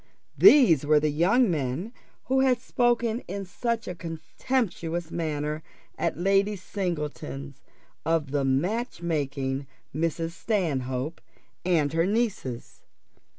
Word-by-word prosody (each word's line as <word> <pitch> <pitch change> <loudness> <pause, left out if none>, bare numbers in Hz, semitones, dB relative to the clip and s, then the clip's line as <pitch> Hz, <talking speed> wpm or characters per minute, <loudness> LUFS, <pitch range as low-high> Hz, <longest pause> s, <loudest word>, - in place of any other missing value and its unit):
These 250 - +7
were 150 +1 +5
the 150 0 +1
young 190 - +3
men 150 - -2 0.3
who 265 +1 +1
had 260 -2 +3
spoken 240 -1 +1
in 195 +2 -4
such 235 +4 -2
a 180 - -3
contemptuous 170 0 -3
manner 155 -2 -2 0.3
at - - -1
Lady 195 +3 +2
Singleton's 150 -7 -4 0.4
of 160 -3 0
the 145 -1 +1
match 175 - -1
making 140 -4 -2 0.3
Mrs. 165 +2 -1
Stanhope 160 - -2 0.4
and 160 -5 +2
her 165 +2 +2
nieces. 200 - -2
165 Hz, 110 wpm, -27 LUFS, 150-205 Hz, 0.4 s, These